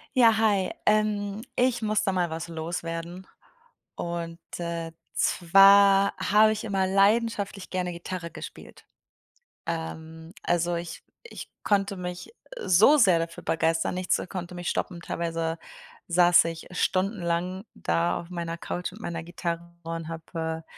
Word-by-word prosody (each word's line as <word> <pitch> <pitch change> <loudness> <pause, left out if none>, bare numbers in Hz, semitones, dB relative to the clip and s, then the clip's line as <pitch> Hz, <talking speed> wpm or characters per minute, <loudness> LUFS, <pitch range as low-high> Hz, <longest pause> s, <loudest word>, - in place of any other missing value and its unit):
Ja 230 -3 +6
hi, 205 -4 +2
ähm, 210 -1 +1
ich 250 -1 +2
muss 215 -1 +1
da 195 - +1
mal 180 -2 0
was 165 +2 -5
loswerden. 165 +2 -5 0.7
Und, 170 -1 -4 0.2
äh, 170 -1 -4 0.2
zwar 195 +2 +6
habe 210 +3 +4
ich 215 - -5
immer 195 -3 0
leidenschaftlich 200 0 +1
gerne 180 -1 -2
Gitarre 170 0 -6
gespielt. - - -11 0.8
Ähm, 160 0 -6
also, 175 0 +1
ich 170 0 -6 0.2
ich - - -9
konnte 200 -1 +1
mich, 180 0 -6
äh, 485 +1 -10
so 210 - +6
sehr 190 - +5
dafür 165 0 -5
begeistern, 165 +1 0
nichts, 185 0 0
äh, - - -5
konnte 180 -1 -6
mich 175 0 -3
stoppen, 175 -3 -2
teilweise 165 -1 -2 0.5
saß 175 0 +6
ich 165 -1 -5
stundenlang 185 -1 -1
da 85 +1 0
auf 170 - -14
meiner 170 -2 -4
Couch 175 +1 -4
mit 210 - -12
meiner 170 -5 -4
Gitarre 170 0 -5
und 165 0 -5
habe, 160 0 -5
175 Hz, 140 wpm, -26 LUFS, 165-200 Hz, 0.8 s, Ja